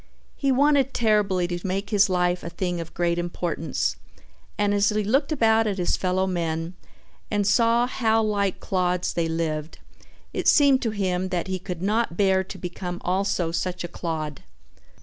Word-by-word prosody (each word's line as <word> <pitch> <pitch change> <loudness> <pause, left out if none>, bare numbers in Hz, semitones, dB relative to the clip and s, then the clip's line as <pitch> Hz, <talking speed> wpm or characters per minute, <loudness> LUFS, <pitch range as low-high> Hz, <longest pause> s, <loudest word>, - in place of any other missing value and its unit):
He 275 -1 0
wanted 275 0 +3
terribly 205 -5 +2
to 175 0 -3
make 195 +3 -3
his 205 -1 +4
life 180 -1 +1
a 170 - -4
thing 175 -1 -3
of 165 - -10
great 170 0 0
importance, 165 - -2 0.6
and 205 0 +2
as 205 0 +3
he 215 0 0
looked 270 +9 +1
about 225 -5 +3
at 200 -2 -1
his 180 - +1
fellow 185 0 0
men 165 -2 -2 0.6
and 205 -1 0
saw 230 +3 +3
how 225 -3 +1
like 200 -2 0
clods 180 -1 -1
they 170 -1 0
lived 160 -1 -3 0.6
it - - -2
seemed 280 -3 +5
to 230 - 0
him 185 -3 -1
that 180 -2 -1
he 185 0 -2
could 180 -2 -6
not 210 -3 0
bear 190 -2 +3
to 190 - -9
become 180 0 -5
also 185 -2 0
such 180 +1 -2
a - - -3
clod. 155 -5 -4
185 Hz, 170 wpm, -24 LUFS, 175-215 Hz, 0.6 s, seemed